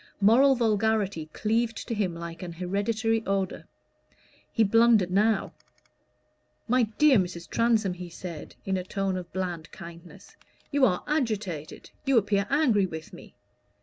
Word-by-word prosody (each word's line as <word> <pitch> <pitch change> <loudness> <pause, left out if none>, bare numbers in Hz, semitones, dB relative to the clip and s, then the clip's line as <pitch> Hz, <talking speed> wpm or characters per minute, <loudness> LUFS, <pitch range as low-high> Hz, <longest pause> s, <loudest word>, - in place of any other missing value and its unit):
Moral 250 +7 +5
vulgarity 215 -7 0
cleaved 225 +4 -1
to - - -2
him 195 -6 -1
like 170 0 -7
an 175 -2 -6
hereditary 215 +5 -1
odor. 195 -1 -2 0.8
He 225 - +3
blundered 220 -3 +4
now. 210 +2 +1 1.1
"My 250 -1 +3
dear 295 -7 +6
Mrs. 175 -2 -4
Transome," 225 -4 +1
he 180 0 -8
said, 170 -2 -8
in 190 -1 0
a 185 - -3
tone 195 0 -2
of 180 -2 -6
bland 175 -4 -4
kindness, 170 +1 -12 0.4
"you 280 -2 +4
are 180 -7 0
agitated 215 - -3
you 270 -3 +2
appear 200 -1 +1
angry 250 -9 +3
with 160 -2 -8
me. - - -13
200 Hz, 140 wpm, -27 LUFS, 180-225 Hz, 1.1 s, dear